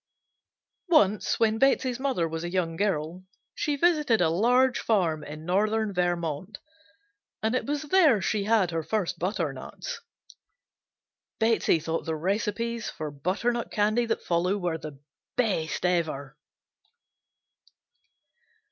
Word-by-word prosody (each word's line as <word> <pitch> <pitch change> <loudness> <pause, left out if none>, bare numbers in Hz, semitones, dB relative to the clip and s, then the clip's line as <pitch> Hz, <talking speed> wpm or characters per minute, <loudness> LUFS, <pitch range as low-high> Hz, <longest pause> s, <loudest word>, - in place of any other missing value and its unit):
Once 210 - +3
when 220 -1 +2
Betsey's 260 -2 +2
mother 260 -12 0
was 165 +1 -5
a 175 - -3
young 175 -2 -1
girl 175 -2 -1 0.3
she 295 - -1
visited 300 -7 +3
a 165 -2 +3
large 245 +7 +3
farm 170 -8 +1
in 150 +1 -9
northern 210 +3 +1
Vermont 175 +1 -2 0.9
and 220 +1 +1
it 255 - -1
was 290 0 -1
there 305 - +4
she 200 +2 -1
had 210 -5 +3
her 165 -1 -1
first 175 +3 -2
butternuts. 170 -8 -4 1.4
Betsey 225 -6 +3
thought 165 +1 -3
the 160 - -2
recipes 215 +6 -2
for 155 -1 -6
butternut 200 - -1
candy 215 +3 +1
that - - -1
follow 180 +3 +1
were 175 -4 -2
the 150 -3 -9 0.4
best 190 -9 0
ever. 155 -6 -1
195 Hz, 120 wpm, -27 LUFS, 165-230 Hz, 1.4 s, there